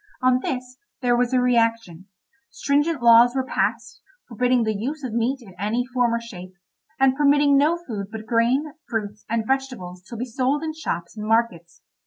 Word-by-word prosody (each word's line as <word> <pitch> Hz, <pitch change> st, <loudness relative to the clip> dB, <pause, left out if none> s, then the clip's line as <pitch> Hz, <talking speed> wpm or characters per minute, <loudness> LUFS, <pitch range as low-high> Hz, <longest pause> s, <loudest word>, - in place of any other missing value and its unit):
On 255 Hz, 0 st, +3 dB
this, 255 Hz, -1 st, -5 dB, 0.2 s
there 245 Hz, -1 st, +3 dB
was 245 Hz, 0 st, +1 dB
a 255 Hz, -, +3 dB
reaction; 230 Hz, -7 st, 0 dB, 0.4 s
stringent 290 Hz, 0 st, 0 dB
laws 235 Hz, +1 st, +6 dB
were 265 Hz, -1 st, 0 dB
passed, -, -, -2 dB, 0.3 s
forbidding 250 Hz, +1 st, +1 dB
the 220 Hz, -1 st, 0 dB
use 270 Hz, +9 st, -4 dB
of 250 Hz, -4 st, -4 dB
meat 240 Hz, +3 st, -1 dB
in 195 Hz, -4 st, -14 dB
any 225 Hz, +5 st, -1 dB
form 245 Hz, -2 st, +2 dB
or -, -, -1 dB
shape, 185 Hz, -6 st, -10 dB, 0.5 s
and 265 Hz, -1 st, +4 dB
permitting 285 Hz, 0 st, +4 dB
no 300 Hz, +5 st, +3 dB
food 205 Hz, -5 st, -5 dB
but 220 Hz, -1 st, -7 dB
grain, 235 Hz, +6 st, +2 dB, 0.2 s
fruits, 210 Hz, -2 st, -4 dB
and 225 Hz, 0 st, -1 dB
vegetables 250 Hz, -9 st, -3 dB
to 235 Hz, -, -8 dB
be 235 Hz, +3 st, -3 dB
sold 260 Hz, +5 st, -1 dB
in 315 Hz, -1 st, -3 dB
shops 200 Hz, -, -5 dB
and 210 Hz, -1 st, -6 dB
markets. 215 Hz, -7 st, -1 dB
240 Hz, 180 wpm, -23 LUFS, 220-265 Hz, 0.5 s, laws